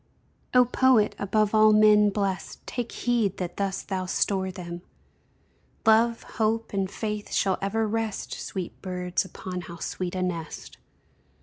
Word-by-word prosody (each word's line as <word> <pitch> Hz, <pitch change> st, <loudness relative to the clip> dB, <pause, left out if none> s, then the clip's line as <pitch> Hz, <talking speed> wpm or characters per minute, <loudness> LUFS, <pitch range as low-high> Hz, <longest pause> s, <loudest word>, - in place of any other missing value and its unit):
O 250 Hz, 0 st, +7 dB
Poet! 250 Hz, -3 st, +3 dB
above 210 Hz, +1 st, +1 dB
all 215 Hz, 0 st, +6 dB
men 210 Hz, -1 st, +6 dB
blest, 200 Hz, -2 st, -3 dB
Take 245 Hz, -2 st, -4 dB
heed 230 Hz, -6 st, 0 dB
that 180 Hz, -2 st, -5 dB
thus 195 Hz, -1 st, -2 dB
thou 185 Hz, -2 st, -3 dB
store 190 Hz, 0 st, 0 dB
them; 175 Hz, -2 st, -7 dB, 1.0 s
Love, 230 Hz, +1 st, +4 dB, 0.2 s
Hope, 225 Hz, +1 st, 0 dB
and 195 Hz, -1 st, 0 dB
Faith 210 Hz, 0 st, -4 dB
shall 190 Hz, -2 st, +1 dB
ever 215 Hz, +3 st, 0 dB
rest, 225 Hz, -1 st, -2 dB
Sweet 185 Hz, -3 st, -6 dB
birds 180 Hz, -1 st, -2 dB
(upon 185 Hz, -1 st, -6 dB
how 170 Hz, 0 st, -9 dB
sweet 180 Hz, +2 st, -4 dB
a 185 Hz, -, -1 dB
nest!) 170 Hz, -3 st, -5 dB
200 Hz, 140 wpm, -26 LUFS, 185-220 Hz, 1.0 s, O